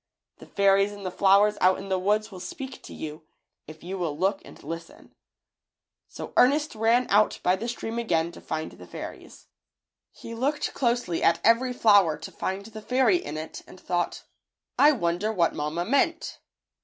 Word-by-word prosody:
The - - -14
fairies 200 0 +3
in 205 -1 -10
the 185 - -3
flowers 200 +2 +4
out 185 +1 +4
in 195 - -8
the 190 -1 +1
woods 210 +3 0
will 185 - -9
speak 265 +7 -7
to - - -11
you, 155 0 -8 0.4
if 155 0 -12
you 190 +2 -5
will 160 -5 -2
look 195 +3 0
and - - -15
listen.^^ 165 0 -9 1.0
So - - -9
Ernest 290 +4 +4
ran 230 +3 +2
out 210 +2 +3
by 180 - +3
the 220 +5 -5
stream 235 -1 -4
again 170 -7 0
to - - -13
find 155 0 -4
the - - -13
fairies. - - -9 0.7
He 230 - -10
looked 275 +6 -1
closely 240 -9 0
at 165 0 +3
every 235 +3 +4
flower 205 -10 +4
to 160 - -9
And 190 +1 -2
the 220 0 -9
fairy 250 -4 +3
in 150 -2 -6
it 155 +1 -7
and 185 - -14
thought, 175 -1 -2 0.5
"I 295 - +6
wonder 185 - -1
what 170 -6 +1
mamma 155 +4 -3
meant." 280 - 0
200 Hz, 180 wpm, -26 LUFS, 175-230 Hz, 1.0 s, I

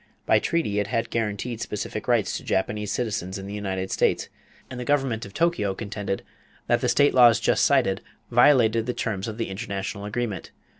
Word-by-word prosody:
By - - +4
treaty 130 -12 0
it 105 - -1
had 115 +2 -2
guaranteed 115 +1 -2
specific 105 - -4
rights - - +2
to - - -5
Japanese 105 +2 -1
citizens 100 -5 -2
in 95 - -7
the 100 - -7
United 95 -2 -3
States, - - +1 0.4
and 130 - -8
the - - -3
government 130 -6 0
at 100 - -16
Tokyo 165 - +1
contended 100 -2 -4 0.4
that - - +2
the - - +1
state 145 0 +4
laws 120 -4 +7
just - - +2
cited 95 0 +3 0.3
violated 115 -3 +4
the 125 - -2
terms 100 -3 -2
of 110 -1 -5
the 115 - -3
international 100 0 -4
agreement. 105 -2 -3
110 Hz, 185 wpm, -25 LUFS, 100-120 Hz, 0.4 s, laws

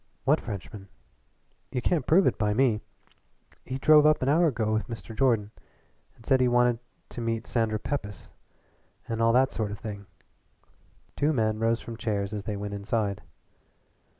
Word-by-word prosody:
"What - - +3
Frenchman?" 100 0 -7 0.8
"You 125 - -1
can't 150 +2 0
prove 180 +4 +5
it - - +1
by 105 -1 +1
me. 115 -4 +2 0.8
He 130 - -4
drove 150 +2 +6
up 155 -2 +4
an 130 - +1
hour 165 +4 +4
ago 110 -6 0
with 110 - -1
Mr. 115 -1 -8
Jordan, 115 -5 +2 0.6
and 115 - -19
said 130 -1 +3
he 125 - +4
wanted 120 -1 +3 0.3
to 120 - -7
meet 115 0 -2
Sandra 110 -2 0
Pepys, 105 -5 -5 0.8
and 115 0 -2
all 115 0 +4
that 130 +2 +4
sort 110 -2 -2
of 105 - -6
thing." 100 -2 -8 1.1
Two 150 +2 +1
men 110 -4 0
rose 115 +1 +1
from 115 -1 -8
chairs 100 -2 -2
as 105 -1 -5
they 105 -2 -3
went 105 0 -5
inside. 100 0 -2
115 Hz, 170 wpm, -27 LUFS, 105-130 Hz, 1.1 s, drove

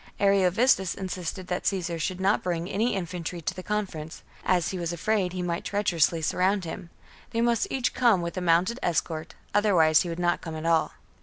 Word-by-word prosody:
Ariovistus 195 +1 +3
insisted 185 -1 -5
that 180 0 -2
Caesar 175 -4 -1
should 180 +3 -2
not 195 +2 +2
bring 175 -1 -2
any 220 +4 0
infantry 175 -2 -4
to 165 - -2
the 185 - -7
conference, 185 -7 -4 0.2
as 180 -2 +2
he 185 - -4
was 170 -1 -2
afraid 185 +2 0
he 180 -1 -3
might 170 -1 -2
treacherously 170 -5 +1
surround 185 +3 +1
him; 165 +1 -7 0.4
they 230 - -2
must 235 -1 +2
each 260 -2 -1
come 230 -8 +3
with 170 - -4
a 185 - -2
mounted 180 +8 +2
escort, 160 -1 -2 0.2
otherwise 180 -7 +4
he 175 - -3
would 165 - -4
not 175 0 +1
come 160 -1 -6
at 155 +1 -6
all. 165 -1 +2
180 Hz, 190 wpm, -27 LUFS, 170-195 Hz, 0.4 s, otherwise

